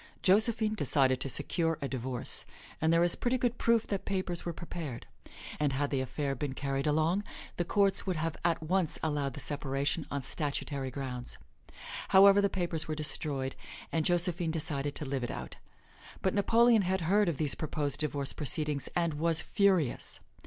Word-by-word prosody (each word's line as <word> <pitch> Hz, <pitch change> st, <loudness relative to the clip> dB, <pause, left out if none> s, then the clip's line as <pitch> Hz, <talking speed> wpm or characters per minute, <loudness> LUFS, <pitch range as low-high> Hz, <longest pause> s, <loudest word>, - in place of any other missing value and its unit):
Josephine 215 Hz, +2 st, +3 dB
decided 130 Hz, -10 st, +2 dB
to 135 Hz, -, -1 dB
secure 165 Hz, +4 st, 0 dB
a 140 Hz, -, -2 dB
divorce, 130 Hz, -1 st, -1 dB, 0.4 s
and 160 Hz, 0 st, +3 dB
there 165 Hz, +1 st, +4 dB
is 175 Hz, -, +4 dB
pretty 250 Hz, +1 st, 0 dB
good 245 Hz, -1 st, -1 dB
proof 230 Hz, -1 st, +3 dB
that 195 Hz, -1 st, -3 dB
papers 185 Hz, -3 st, -2 dB
were 170 Hz, -, -2 dB
prepared; 160 Hz, -6 st, -6 dB, 0.5 s
and 145 Hz, -2 st, +1 dB
had 140 Hz, +1 st, -1 dB
the 135 Hz, -2 st, +1 dB
affair 135 Hz, +2 st, -2 dB
been 135 Hz, +1 st, -3 dB
carried 135 Hz, +1 st, -2 dB
along, 160 Hz, +6 st, +2 dB, 0.3 s
the 175 Hz, -, 0 dB
courts 200 Hz, +2 st, +2 dB
would 185 Hz, -, 0 dB
have 165 Hz, 0 st, -2 dB
at 165 Hz, -2 st, +1 dB
once 180 Hz, 0 st, 0 dB
allowed 145 Hz, -4 st, -1 dB
the -, -, -6 dB
separation 140 Hz, +2 st, -1 dB
on 140 Hz, -1 st, -3 dB
statutory 140 Hz, -1 st, -2 dB
grounds. 125 Hz, -2 st, -5 dB, 0.7 s
However, 200 Hz, +1 st, +7 dB
the 200 Hz, -, +2 dB
papers 175 Hz, -4 st, -2 dB
were 155 Hz, -, -2 dB
destroyed, 140 Hz, -3 st, -1 dB, 0.4 s
and 160 Hz, -, +1 dB
Josephine 175 Hz, 0 st, +2 dB
decided 145 Hz, -3 st, -2 dB
to 150 Hz, -, -3 dB
live 135 Hz, -2 st, -2 dB
it 120 Hz, -, -3 dB
out. -, -, -6 dB, 0.7 s
But 190 Hz, -, +2 dB
Napoleon 230 Hz, +2 st, +4 dB
had 190 Hz, 0 st, 0 dB
heard 195 Hz, +4 st, +3 dB
of 160 Hz, -, -2 dB
these 145 Hz, -3 st, +2 dB
proposed 150 Hz, 0 st, -3 dB
divorce 145 Hz, -2 st, -1 dB
proceedings 150 Hz, -2 st, -1 dB
and 170 Hz, -2 st, +1 dB
was 160 Hz, +2 st, +2 dB
furious. 190 Hz, -, +1 dB
155 Hz, 175 wpm, -31 LUFS, 140-185 Hz, 0.7 s, However